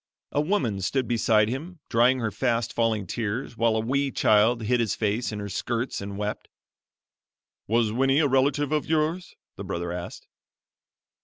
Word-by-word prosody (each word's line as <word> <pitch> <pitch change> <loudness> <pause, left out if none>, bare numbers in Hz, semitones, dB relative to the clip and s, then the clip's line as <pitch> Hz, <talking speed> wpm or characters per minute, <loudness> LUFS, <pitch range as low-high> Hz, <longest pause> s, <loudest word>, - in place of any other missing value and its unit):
A 145 - +1
woman 135 - 0
stood 130 +6 0
beside 110 -3 +3
him 155 +9 -5
drying 125 +3 +3
her 110 -2 -1
fast 120 -3 -1
falling 115 -3 0
tears 115 +6 -3
while 115 -1 +2
a - - +1
wee 135 +5 0
child 110 0 +3
hid 125 +3 +1
his 115 -3 0
face 110 +3 -1
in 105 - -5
her 100 0 -5
skirts 115 +5 -3
and 100 0 -6
wept. 105 +1 -4 1.2
"Was 115 0 +2
Winnie 135 +4 +2
a 150 -1 +4
relative 140 +2 +1
of 150 -1 0
yours?" 160 +3 -1 0.2
the - - -6
brother 85 0 -4
asked. 90 0 -7
115 Hz, 165 wpm, -26 LUFS, 105-135 Hz, 1.2 s, a